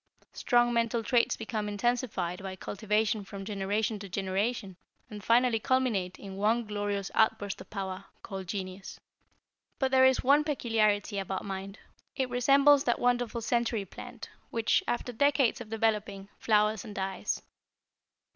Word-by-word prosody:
Strong 240 -1 +2
mental 230 0 +1
traits 235 +1 +2
become 215 -2 -3
intensified 205 -5 -1
by 190 -1 -6
cultivation 210 +2 -1
from 195 0 -8
generation 210 +2 -1
to 200 -1 -8
generation 195 +2 -2 0.4
and 210 -1 -8
finally 235 0 +3
culminate 220 -8 0
in 195 -1 -9
one 225 +4 +2
glorious 205 -1 -3
outburst 220 -2 +1
of - - -12
power, 195 -1 -5 0.2
called 190 -3 -6
Genius. 190 0 -6 0.8
But 265 -1 0
there 260 0 +6
is 260 - +2
one 285 +3 +5
peculiarity 220 -8 +1
about 190 0 -4
mind. 195 +1 -6 0.4
It 260 -2 -1
resembles 275 +3 +5
that 240 - +2
wonderful 245 -1 0
century 235 -2 0
plant 240 +5 -10 0.2
which, 230 -1 +1
after 245 +1 -2
decades 275 0 +2
of 220 - -9
developing, 210 -3 -1
flowers 210 -1 +2
and 210 -2 -9
dies. 190 +1 -3
215 Hz, 140 wpm, -29 LUFS, 195-240 Hz, 0.8 s, there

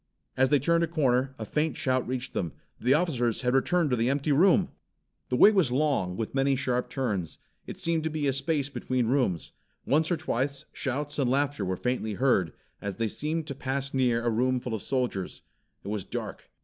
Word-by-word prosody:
As 130 0 +3
they 145 - +5
turned 170 +5 +2
a - - +1
corner, 135 -5 +1
a 110 - -5
faint 155 +8 -1
shout 130 -2 0
reached 130 0 -3
them. 85 -5 -2 0.3
The 130 +3 +3
officers 130 -9 0
had 125 -1 +1
returned 150 +3 +2
to - - +3
the 115 +1 +1
empty 140 +2 0
room! 170 +6 +4 0.6
The 125 - +1
way 205 - +8
was 185 - +2
long, 130 -10 +1
with 110 -1 -3
many 135 0 +2
sharp 125 -2 -1
turns. 105 - -2 0.3
It - - -7
seemed 170 -4 0
to - - +1
be 155 -2 -2
a 135 - +2
space 140 +1 0
between 130 -3 -1
rooms. 125 - 0 0.3
Once 155 +3 +2
or 175 - +1
twice 140 -1 -2
shouts 145 +2 -2
and 130 -3 +2
laughter 140 -3 0
were 95 -1 -2
faintly 125 -3 -2
heard, 100 - +2 0.3
as 100 -2 -4
they 115 -1 -1
seemed 155 +8 -2
to 140 - -5
pass 135 0 -3
near 120 -3 +1
a 120 - +2
room 125 +3 +1
full 125 -1 -5
of 110 - -3
soldiers. 125 -8 -2 0.4
It 100 - -6
was 105 -2 -2
dark. - - -6
130 Hz, 205 wpm, -28 LUFS, 120-145 Hz, 0.6 s, way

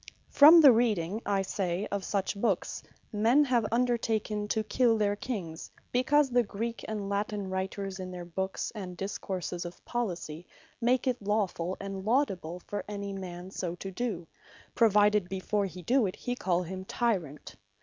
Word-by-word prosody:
From 315 +4 +9
the 285 -4 +10
reading, 215 -4 +1
I 200 -1 +1
say, 185 0 -2
of 200 -1 -2
such 200 +1 -1
books, 200 -2 -1 0.3
men 230 +8 +4
have 245 -5 +1
undertaken 225 -3 0
to 220 +1 0
kill 230 +1 +2
their 205 -1 +1
Kings, 190 -9 -5 0.2
because 270 +2 +3
the 245 0 +4
Greek 230 +1 -4
and 210 -2 -3
Latine 200 -1 -2
writers, 190 +1 -3
in 185 -1 -5
their 180 -1 -7
books, 190 +3 -3
and 185 -5 -7
discourses 190 -2 -4
of 175 0 -9
Policy, 180 -8 -4 0.3
make 245 +1 +2
it 250 -4 -1
lawfull, 195 -4 -1
and 195 -1 -5
laudable, 195 - 0
for 205 0 -4
any 200 -1 -5
man 185 -1 -7
so 175 -3 -3
to 195 +2 -7
do; 195 -4 -3 0.5
provided 210 -3 +4
before 195 +1 -1
he 180 0 -10
do 245 +2 +3
it, 185 - -5
he 245 - -3
call 180 -6 0
him 185 +2 -6
Tyrant. 190 - -2
200 Hz, 160 wpm, -29 LUFS, 185-230 Hz, 0.5 s, the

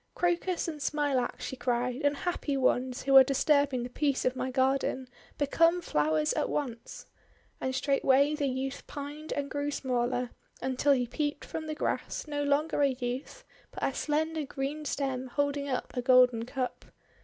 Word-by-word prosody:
'Crocus 350 0 0
and 310 -3 -5
Smilax!' 285 -4 0
she - - -4
cried. 245 +1 -1
'Unhappy 290 0 0
ones, 255 -1 +1
who 275 0 +3
are 265 - +11
disturbing 275 -1 +2
the 245 - -5
peace 280 0 0
of 255 0 +1
my 255 0 -2
garden! 265 0 +1 0.3
Become 330 +4 +3
flowers 155 - +1
at - - -1
once!' 240 -6 -4 0.5
And 260 0 -2
straightway 275 +1 +3
the 295 -2 0
youth 265 +1 -4
pined 295 +2 -7
and 285 -1 -2
grew 285 0 -1
smaller, 250 -3 -1 0.3
until 260 +2 +2
he 250 -2 +1
peeped 290 +4 -3
from 315 -1 -5
the 310 - -3
grass, - - -2
no 290 -1 -3
longer 290 +2 +1
a 285 - +5
youth, 255 - -4 0.3
but - - -8
a 270 - +1
slender 310 +2 -1
green 285 +2 -4
stem 265 -2 -2
holding 285 +2 -1
up 255 0 -3
a 250 - 0
golden 250 -2 +5
cup. 255 -1 -4
275 Hz, 165 wpm, -29 LUFS, 255-290 Hz, 0.5 s, are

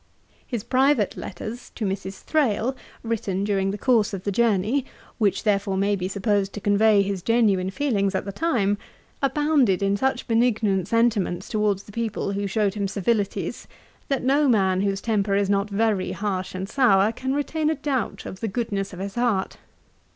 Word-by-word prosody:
His 235 -5 -3
private 260 -3 +2
letters 225 +5 -7
to 220 - -3
Mrs. 195 0 -4
Thrale, 260 -4 +1 0.3
written 205 -4 -2
during 195 -2 0
the 200 - -3
course 220 -4 +2
of 185 - -8
his 200 - -1
journey, 230 +4 +2 0.4
which 205 -4 +1
therefore 200 -2 +1
may 200 +1 +2
be 185 -1 -3
supposed 200 0 0
to - - -5
convey 205 0 +4
his 195 -2 -3
genuine 205 -4 +2
feelings 200 -5 0
at 190 - -1
the 200 - -4
time, 205 - 0 0.4
abound 285 -2 +2
in 195 +1 +1
such 265 +6 -1
benignant 225 -5 +2
sentiments 215 -6 +1
towards 210 -2 0
the - - -14
people 220 -2 -2
who 200 0 -2
showed 200 0 0
him 205 -2 -2
civilities, 200 +1 -1 0.4
that 275 -2 -1
no 280 +2 +3
man 190 -5 +3
whose 195 -1 -1
temper 205 -3 0
is 200 0 +1
not 200 +1 +1
very 210 -2 0
harsh 190 -3 -3
and 190 +1 -4
sour, 215 -4 +4
can 260 +3 -3
retain 305 +2 0
a 315 - +1
doubt 265 -8 -2
of 185 - -7
the 225 - -2
goodness 200 -3 -3
of - - -8
his 195 +1 -4
heart. 235 -6 0
205 Hz, 175 wpm, -24 LUFS, 195-235 Hz, 0.4 s, convey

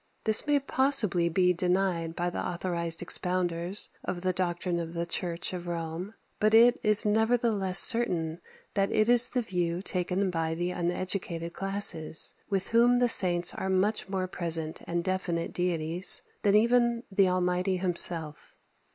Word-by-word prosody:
This 220 +5 +1
may 290 -1 +2
possibly 255 -11 +1
be 180 +2 +1
denied 180 -2 -1
by 175 0 -3
the - - -5
authorized 170 -2 -3
expounders 180 +1 +1
of 180 -1 -5
the 185 0 -2
doctrine 175 -1 -3
of 165 0 -7
the 170 0 -3
Church 170 0 -3
of 175 -1 -7
Rome; 170 +4 -6 0.2
but 215 +1 +2
it 240 +2 +4
is 215 +1 +4
nevertheless 220 -3 0
certain 175 -9 +3 0.3
that 195 -1 -1
it 215 0 +1
is 240 0 +4
the 250 -2 -3
view 175 -3 -3
taken 185 +1 -2
by 165 -1 -3
the 175 +2 -3
uneducated 175 -1 -3
classes, 195 -5 +3 0.2
with 195 -2 -3
whom 240 +2 +3
the 245 0 +1
saints 175 -5 +4
are 190 - -5
much 195 +2 -1
more 190 -1 -3
present 165 -3 -3
and 170 0 -3
definite 180 -2 -3
deities 175 0 +2 0.2
than 205 0 +1
even 235 +1 +1
the 195 -1 +2
Almighty 180 +1 -1
Himself. 170 -4 -2
180 Hz, 150 wpm, -27 LUFS, 170-205 Hz, 0.3 s, it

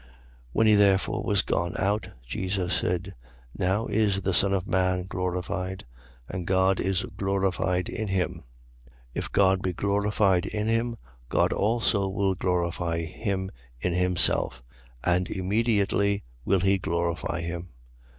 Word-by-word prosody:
13:31. 65 - -23 0.5
When 110 - +3
he 110 - +7
therefore 100 -2 +3
was 100 -3 +3
gone 85 +1 -1
out, 100 0 0 0.2
Jesus 90 +7 -2
said: 90 +2 -1 0.4
Now 95 +5 +1
is 100 -3 +1
the 95 - 0
Son 100 +2 +3
of 95 -2 0
man 95 -2 +1
glorified; 90 +1 -3 0.4
and 90 -2 -5
God 95 0 +3
is 95 -1 0
glorified 95 -2 0
in 110 - -3
him. 95 -3 -1 0.4
13:32. 65 - -23 0.2
If - - -4
God 95 -1 +4
be 95 -1 -1
glorified 100 -1 +2
in 105 0 -2
him, 115 +1 0 0.3
God - - +2
also 105 -2 +1
will 95 0 +1
glorify 85 -2 -1
him 95 +3 -3 0.3
in 85 +8 -1
himself: 90 -8 +1 0.4
and 90 0 +2
immediately 100 0 +1 0.2
will 95 -2 +3
he 95 0 +3
glorify 85 0 -1
him. 85 +1 -5
95 Hz, 140 wpm, -27 LUFS, 90-100 Hz, 0.5 s, he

